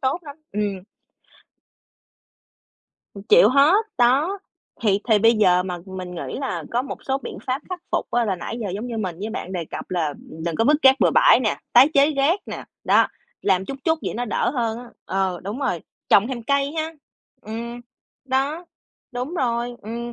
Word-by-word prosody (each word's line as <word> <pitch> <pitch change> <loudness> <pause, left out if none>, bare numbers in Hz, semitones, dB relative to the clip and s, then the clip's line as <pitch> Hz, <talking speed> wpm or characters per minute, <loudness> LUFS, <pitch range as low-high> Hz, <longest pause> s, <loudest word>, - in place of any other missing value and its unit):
tốt 265 +4 0
lắm. 290 -3 -10 0.2
Ừm. 200 -2 -2 2.3
Ừm, 200 - -9
chịu 205 - +6
hết, 300 - +4
đó. 280 +11 +3 0.4
Thì 200 -3 +3
thì 220 -2 +5
bây 225 +3 +5
giờ 185 -5 +4
mà 180 -1 -4
mình 185 -1 -7
nghĩ 175 - -5
là 270 - -3
có 240 +1 +1
một 275 - -7
số 270 0 0
biện - - -8
pháp 260 +3 -1
khắc 365 -1 -5
phục - - -1
á, 240 -1 +2
là 195 -3 -1
nãy 230 +6 -6
giờ 210 - -3
giống 215 +4 -4
như 235 -2 -5
mình 185 -5 -3
với 210 +3 -4
bạn 190 -4 -5
đề 175 -3 -3
cập - - -8
là, 175 -4 0
ừm, 160 +2 -10
đừng 170 -2 -2
có 225 - +2
vứt 295 +5 +5
rác 265 0 +6
bừa - - +5
bãi - - +6
nè, - - 0
tái 275 - +8
chế 280 +2 +5
rác 300 +7 +2
nè, - - -6 0.2
đó, - - +5 0.4
làm 190 -1 +2
chút 275 - -6
chút 320 0 +2
vậy - - -3
nó 245 +2 -2
đỡ 215 - 0
hơn 230 -3 -1
á. 245 0 -11
Ờ, 190 -2 -1
đúng 205 +6 -4
rồi, 180 -11 -1 0.3
trồng 205 +2 +5
thêm 250 -3 -4
cây 280 +3 +1
ha. 320 +1 -2 0.5
Ừm, 235 +3 -6 0.4
đó, 275 +6 -1 0.5
đúng 250 +7 -4
rồi, 240 -5 -1
ừm. 235 +3 -5
235 Hz, 200 wpm, -22 LUFS, 195-275 Hz, 2.3 s, tái